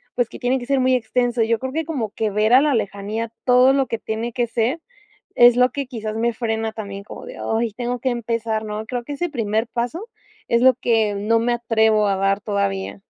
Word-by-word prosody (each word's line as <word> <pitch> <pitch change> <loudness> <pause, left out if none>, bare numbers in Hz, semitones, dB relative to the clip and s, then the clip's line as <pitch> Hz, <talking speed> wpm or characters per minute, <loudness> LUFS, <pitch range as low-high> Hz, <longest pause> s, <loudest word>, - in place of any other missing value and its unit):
pues 245 -2 0
que - - -10
tiene 255 +2 +1
que 245 - -7
ser 275 +1 +1
muy 260 0 +3
extenso. 245 0 0
Yo 225 0 +1
creo 260 +2 -5
que 320 +2 -1
como 265 -10 -3
que 220 0 -1
ver 215 +3 +2
a 260 - +8
la 295 -1 +2
lejanía 210 +2 -3 0.2
todo 250 +1 +5
lo 270 -1 +1
que 230 - -3
tiene 220 +2 -4
que 240 0 0
ser 235 +7 -1 0.6
es 240 0 +7
lo 250 0 +4
que 280 0 -4
quizás 220 -4 -5
me 235 +2 +1
frena 225 -1 -2
también 200 -2 -7
como 210 - -10
de: - - -9
"Ay, 225 -1 -1
tengo 245 +2 -3
que 260 - 0
empezar", 230 -2 -2
¿no?, 215 +1 -5
creo 245 +1 -4
que 290 - -6
ese 345 +5 -2
primer 225 -4 -1
paso 245 - -4 0.4
es 235 0 +2
lo 260 +1 +7
que 225 -4 +1
no 210 +3 +1
me 235 +2 0
atrevo 220 -3 +2
a 195 - +1
dar 195 +1 +1
todavía. 200 -1 -2
230 Hz, 230 wpm, -21 LUFS, 220-250 Hz, 0.6 s, a